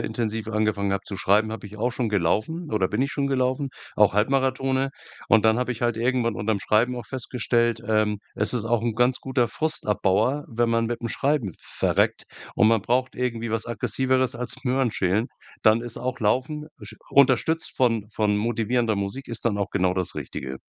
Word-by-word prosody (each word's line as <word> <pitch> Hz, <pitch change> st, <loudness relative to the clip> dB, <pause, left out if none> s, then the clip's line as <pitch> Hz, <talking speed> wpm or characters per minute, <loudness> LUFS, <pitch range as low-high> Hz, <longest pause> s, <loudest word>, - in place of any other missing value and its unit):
intensiv 110 Hz, -1 st, -3 dB
angefangen 105 Hz, -2 st, 0 dB
habe 100 Hz, -, -4 dB
zu 100 Hz, -, -6 dB
schreiben, 105 Hz, +3 st, +2 dB
habe 110 Hz, -, -7 dB
ich 105 Hz, +2 st, -11 dB
auch 120 Hz, +4 st, 0 dB
schon 120 Hz, -1 st, -1 dB
gelaufen 110 Hz, -, -1 dB
oder 95 Hz, -4 st, +1 dB
bin 130 Hz, -, 0 dB
ich 140 Hz, -, -1 dB
schon 140 Hz, -1 st, -1 dB
gelaufen, 130 Hz, +1 st, 0 dB, 0.3 s
auch 105 Hz, -1 st, +4 dB
Halbmarathons. 130 Hz, +3 st, +1 dB, 0.4 s
Und 110 Hz, -1 st, +5 dB
dann 110 Hz, +2 st, +4 dB
habe 125 Hz, 0 st, -1 dB
ich 115 Hz, -, -8 dB
halt 120 Hz, -2 st, +1 dB
irgendwann 120 Hz, -2 st, 0 dB
unterm 105 Hz, 0 st, 0 dB
Schreiben 120 Hz, +6 st, +2 dB
auch 120 Hz, -, -7 dB
festgestellt, 120 Hz, -2 st, 0 dB
ähm: 110 Hz, -2 st, +1 dB, 0.2 s
Es -, -, +2 dB
ist 115 Hz, -, 0 dB
auch 115 Hz, 0 st, +1 dB
'n 115 Hz, -2 st, -1 dB
ganz 125 Hz, +2 st, +2 dB
guter 130 Hz, -2 st, +1 dB
Frustabbauer, 110 Hz, -2 st, 0 dB
wenn 115 Hz, 0 st, 0 dB
man 115 Hz, 0 st, +1 dB
mit'm 120 Hz, 0 st, -3 dB
Schreiben 140 Hz, -9 st, 0 dB
verreckt -, -, 0 dB, 0.3 s
und 110 Hz, -, +4 dB
man 115 Hz, -1 st, +3 dB
braucht 130 Hz, +5 st, 0 dB
irgendwie 115 Hz, -2 st, -2 dB
was 115 Hz, -1 st, -1 dB
Aggressiveres 130 Hz, +2 st, +1 dB
als 125 Hz, +1 st, -2 dB
Möhrenschälen, 120 Hz, -4 st, +1 dB, 0.3 s
dann 110 Hz, +1 st, +4 dB
ist 120 Hz, -1 st, -5 dB
auch 130 Hz, +1 st, -3 dB
Laufen 130 Hz, +8 st, 0 dB, 0.2 s
sch -, -, -8 dB, 0.2 s
unterstützt 140 Hz, +4 st, +3 dB
von 115 Hz, -5 st, +1 dB
von 105 Hz, -1 st, +1 dB
motivierender 115 Hz, 0 st, 0 dB
Musik, 100 Hz, +8 st, -4 dB
ist 115 Hz, 0 st, +1 dB
dann 105 Hz, -3 st, +1 dB
auch 100 Hz, -, -1 dB
genau 95 Hz, -1 st, +1 dB
das 90 Hz, -1 st, -1 dB
Richtige. 65 Hz, 0 st, -5 dB
115 Hz, 185 wpm, -24 LUFS, 105-130 Hz, 0.4 s, Und